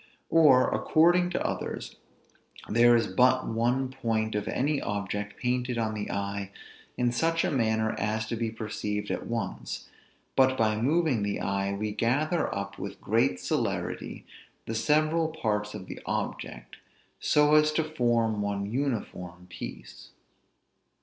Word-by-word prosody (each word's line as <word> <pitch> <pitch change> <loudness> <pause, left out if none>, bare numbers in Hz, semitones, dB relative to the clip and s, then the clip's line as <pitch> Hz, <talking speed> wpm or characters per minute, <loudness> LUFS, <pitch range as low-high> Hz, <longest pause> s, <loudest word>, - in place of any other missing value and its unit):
Or, 150 -6 +6
according 175 +3 +4
to 180 - -2
others, - - -4 0.7
there 120 +2 +5
is 115 - +3
but 130 +1 +3
one 120 +4 0
point 110 -4 -1
of 105 -1 -2
any 145 +2 0
object 105 0 -3
painted 125 0 -1
on 110 -1 0
the 105 -1 -4
eye 100 0 -3 0.5
in 120 -1 +2
such 165 +7 +1
a - - 0
manner 110 -4 +1
as 110 +1 -1
to - - -1
be 115 0 -1
perceived 105 -1 -4
at - - -3
once, 115 -1 -4 0.5
but 130 0 +4
by 110 -1 +2
moving 150 -2 +2
the 100 0 -1
eye, 100 0 -1
we 105 +1 -2
gather 145 +10 +1
up, 100 0 -5
with 100 0 -6
great 105 -4 +1
celerity, - - -2 0.4
the 115 - -4
several 155 +7 +2
parts 105 -9 -2
of 95 - -7
the - - -8
object, - - -4 0.4
so 150 0 +4
as 155 0 +5
to 160 - +2
form 120 -8 +1
one 100 -1 -1
uniform 105 -9 -3
piece. - - -9
115 Hz, 145 wpm, -28 LUFS, 105-135 Hz, 0.7 s, Or